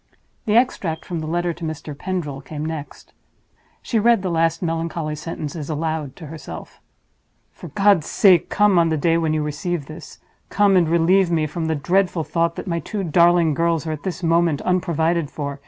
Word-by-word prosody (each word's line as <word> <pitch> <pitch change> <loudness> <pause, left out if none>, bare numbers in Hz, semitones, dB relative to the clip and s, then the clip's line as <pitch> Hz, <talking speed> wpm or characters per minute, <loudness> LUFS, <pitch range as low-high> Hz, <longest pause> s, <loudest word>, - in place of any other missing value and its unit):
The 210 - +2
extract 200 -9 +1
from 175 -2 -4
the 155 - -5
letter 175 +1 -1
to 170 - -12
Mr. 155 -2 -5
Pendril 150 -5 -4
came 150 +2 -6
next. 155 -2 -7 0.7
She 230 - 0
read 230 -2 +3
the 185 - -1
last 165 +1 +1
melancholy 165 -1 -2
sentences 155 -1 -6
aloud 155 -2 -3
to 165 - -10
herself: 155 +1 -9 0.7
"For - - -11
God's 200 -6 +3
sake 185 -5 +4
come 205 -3 +4
on 165 -1 +3
the 160 - 0
day 165 +3 +2
when 160 -1 0
you 155 - 0
receive 150 +1 -3
this—come 190 +5 -2
and 170 -3 +3
relieve 170 +3 +3
me 160 -2 +1
from 160 +2 -4
the 160 - 0
dreadful 180 +3 +1
thought 170 +1 0
that - - -6
my 170 -3 -1
two 200 +3 -4
darling 170 -1 +4
girls 165 0 0
are 160 - -2
at 155 -2 -5
this 185 +1 -5
moment 165 -3 +2
unprovided 170 -3 0
for. 140 -2 -5
165 Hz, 185 wpm, -21 LUFS, 155-175 Hz, 0.7 s, sake